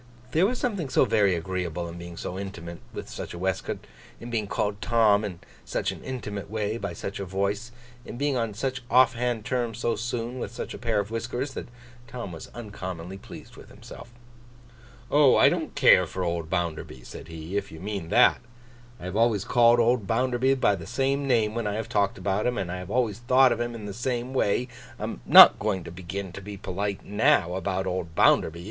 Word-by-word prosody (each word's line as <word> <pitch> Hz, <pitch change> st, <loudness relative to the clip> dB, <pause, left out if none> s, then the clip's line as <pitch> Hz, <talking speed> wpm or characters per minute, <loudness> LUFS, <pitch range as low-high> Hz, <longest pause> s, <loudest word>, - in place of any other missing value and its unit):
There 175 Hz, +5 st, +4 dB
was 250 Hz, +3 st, -2 dB
something 200 Hz, -, -2 dB
so -, -, +4 dB
very 100 Hz, -4 st, +3 dB
agreeable 85 Hz, -1 st, -3 dB
in 85 Hz, +1 st, -8 dB
being 85 Hz, 0 st, -9 dB
so 90 Hz, -, -5 dB
intimate 85 Hz, -4 st, -7 dB
with -, -, -7 dB
such -, -, -7 dB
a -, -, -7 dB
waistcoat; 95 Hz, +1 st, -3 dB, 0.3 s
in 120 Hz, +1 st, -8 dB
being 110 Hz, -3 st, -1 dB
called 105 Hz, 0 st, -2 dB
Tom, 110 Hz, -3 st, +3 dB
in 90 Hz, -5 st, -5 dB, 0.2 s
such -, -, -2 dB
an -, -, -10 dB
intimate 105 Hz, -7 st, -5 dB
way, 110 Hz, +1 st, -2 dB
by 100 Hz, -5 st, -4 dB
such 100 Hz, +4 st, -6 dB
a -, -, -3 dB
voice; 100 Hz, +5 st, -2 dB, 0.3 s
in 120 Hz, -, -8 dB
being 140 Hz, +1 st, 0 dB
on 115 Hz, -4 st, -1 dB
such 130 Hz, +2 st, -2 dB
off 125 Hz, 0 st, +5 dB
hand 120 Hz, -3 st, -2 dB
terms 120 Hz, -4 st, -1 dB
so 120 Hz, 0 st, 0 dB
soon, 120 Hz, +2 st, -4 dB
with -, -, -4 dB
such 120 Hz, -, -6 dB
a -, -, -8 dB
pair 115 Hz, -3 st, 0 dB
of 100 Hz, +1 st, -3 dB
whiskers; 120 Hz, +4 st, -3 dB
that -, -, -6 dB, 0.4 s
Tom 120 Hz, -7 st, -6 dB
was 80 Hz, -, -9 dB
uncommonly 95 Hz, -5 st, -7 dB
pleased -, -, -12 dB
with -, -, -14 dB
himself. 120 Hz, -, -12 dB, 1.0 s
'Oh! 145 Hz, -2 st, +6 dB
I -, -, +7 dB
don't -, -, -3 dB
care -, -, +6 dB
for 95 Hz, -, -4 dB
old 85 Hz, -2 st, -2 dB
Bounderby,' 80 Hz, -8 st, -3 dB
said -, -, -10 dB
he, 80 Hz, +3 st, -7 dB
'if 100 Hz, -, -2 dB
you 80 Hz, -, -10 dB
mean 95 Hz, -3 st, -5 dB
that. -, -, +5 dB, 0.6 s
I -, -, -9 dB
have 90 Hz, +1 st, -5 dB
always 110 Hz, -3 st, +2 dB
called 120 Hz, 0 st, +5 dB
old 120 Hz, -3 st, +2 dB
Bounderby 125 Hz, +3 st, +2 dB
by 130 Hz, -6 st, +3 dB
the 85 Hz, -3 st, -9 dB
same 135 Hz, +1 st, 0 dB
name 110 Hz, -4 st, +2 dB
when 115 Hz, -2 st, -2 dB
I 105 Hz, -, -2 dB
have 110 Hz, +1 st, -4 dB
talked 100 Hz, -4 st, +1 dB
about 100 Hz, +4 st, 0 dB
him, 125 Hz, 0 st, -1 dB
and 90 Hz, -2 st, -2 dB
I 90 Hz, -, -4 dB
have 90 Hz, 0 st, -8 dB
always 115 Hz, -3 st, 0 dB
thought 130 Hz, +1 st, +5 dB
of 120 Hz, -, -1 dB
him 120 Hz, 0 st, -2 dB
in 110 Hz, -2 st, -7 dB
the 100 Hz, -, -5 dB
same 120 Hz, +3 st, -3 dB
way. 125 Hz, 0 st, +1 dB, 0.3 s
I -, -, -5 dB
am -, -, -5 dB
not -, -, +10 dB
going 100 Hz, -4 st, -1 dB
to -, -, -9 dB
begin 95 Hz, +2 st, -6 dB
to 95 Hz, -, -9 dB
be 100 Hz, +1 st, -8 dB
polite 100 Hz, +2 st, -4 dB
now, 105 Hz, -, +2 dB
about 95 Hz, 0 st, -2 dB
old 90 Hz, -3 st, -3 dB
Bounderby. 80 Hz, +1 st, +3 dB
105 Hz, 215 wpm, -26 LUFS, 95-120 Hz, 1.0 s, not